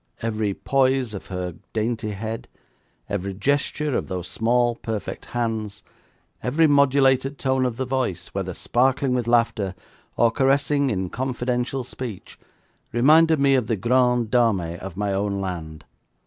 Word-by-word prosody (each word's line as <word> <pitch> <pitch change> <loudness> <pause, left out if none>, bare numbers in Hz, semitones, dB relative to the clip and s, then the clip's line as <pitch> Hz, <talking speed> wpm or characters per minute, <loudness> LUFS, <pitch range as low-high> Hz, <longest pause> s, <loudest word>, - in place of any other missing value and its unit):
Every 110 -3 -1
poise 130 -3 +1
of 100 - -7
her 90 -2 -4 0.2
dainty 110 -1 -1
head; 110 +3 -5 0.6
every 100 -1 -3
gesture 145 +4 0
of - - -1
those 90 -1 -4
small, 120 +1 +1
perfect 110 -3 -5
hands; 110 -4 -3 0.6
every 150 +6 +2
modulated 140 -1 +3
tone 130 -1 +1
of 115 -2 -5
the 130 - -1
voice, 125 -10 -2
whether 95 -2 -4
sparkling 130 +1 +1
with 125 -2 -1
laughter 115 -5 +1 0.4
or 115 -1 +4
caressing 140 +2 +2
in 95 -5 -2
confidential 125 0 -2
speech, 120 -4 -8 0.5
reminded 155 +6 +5
me 140 0 +4
of 125 -4 +2
the 115 - +1
grandes 125 +1 +2
dames 95 -9 +1
of 95 -2 -8
my 100 -1 -1
own 100 0 -1
land. 80 -5 -5
120 Hz, 140 wpm, -23 LUFS, 100-130 Hz, 0.6 s, reminded